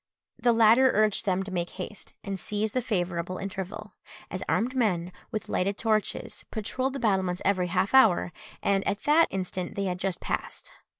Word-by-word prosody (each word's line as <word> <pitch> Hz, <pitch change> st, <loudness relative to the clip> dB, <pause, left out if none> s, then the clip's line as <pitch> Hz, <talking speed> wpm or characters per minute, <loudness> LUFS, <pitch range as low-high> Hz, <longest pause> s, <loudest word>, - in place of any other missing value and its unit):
The 240 Hz, -, +4 dB
latter 230 Hz, +3 st, +6 dB
urged 215 Hz, -1 st, +2 dB
them 190 Hz, 0 st, +1 dB
to 195 Hz, -, -8 dB
make 175 Hz, -1 st, -2 dB
haste, 195 Hz, +2 st, -7 dB
and 195 Hz, -1 st, -4 dB
seize 210 Hz, +3 st, -1 dB
the 255 Hz, -, 0 dB
favourable 180 Hz, -5 st, -2 dB
interval, 195 Hz, +2 st, -6 dB, 0.4 s
as 185 Hz, -, -4 dB
armed 245 Hz, +4 st, +1 dB
men, 180 Hz, -8 st, +1 dB, 0.2 s
with 215 Hz, -3 st, -4 dB
lighted 195 Hz, +2 st, 0 dB
torches, 215 Hz, -2 st, -1 dB
patrolled 255 Hz, +4 st, -2 dB
the 275 Hz, -, -4 dB
battlements 190 Hz, -5 st, 0 dB
every 185 Hz, -2 st, +2 dB
half 185 Hz, +4 st, 0 dB
hour, 220 Hz, -9 st, +5 dB, 0.3 s
and 195 Hz, -1 st, +2 dB
at 200 Hz, +1 st, -1 dB
that 315 Hz, +3 st, +5 dB
instant 185 Hz, -1 st, -4 dB
they 200 Hz, -, -1 dB
had 180 Hz, -1 st, -2 dB
just 190 Hz, -1 st, -2 dB
passed. -, -, -4 dB
200 Hz, 175 wpm, -27 LUFS, 185-220 Hz, 0.4 s, latter